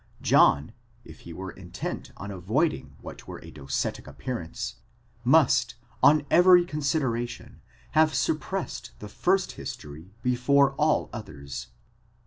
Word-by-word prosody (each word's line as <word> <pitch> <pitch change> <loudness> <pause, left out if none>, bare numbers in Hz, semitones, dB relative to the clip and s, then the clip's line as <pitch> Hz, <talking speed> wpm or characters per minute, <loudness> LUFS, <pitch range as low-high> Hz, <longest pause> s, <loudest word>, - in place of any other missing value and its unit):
John, 75 +8 +4 0.3
if 80 -1 -13
he 85 - -11
were 95 +3 -6
intent - - -6
on 100 +2 -6
avoiding 100 - -1
what - - -9
avore - - -9
a - - -11
docetic 70 -1 -3
appearance, 85 - -5 0.5
must - - +4 0.3
on 150 0 +5
every 180 0 +7
consideration 140 -7 -2 0.3
have 155 0 +3
suppressed 155 -3 -2
the 105 - -8
first 190 - +1
history 80 +7 -9
before 135 +2 +3
all 150 +2 +1
others. 70 -11 -7
125 Hz, 115 wpm, -27 LUFS, -, 0.5 s, every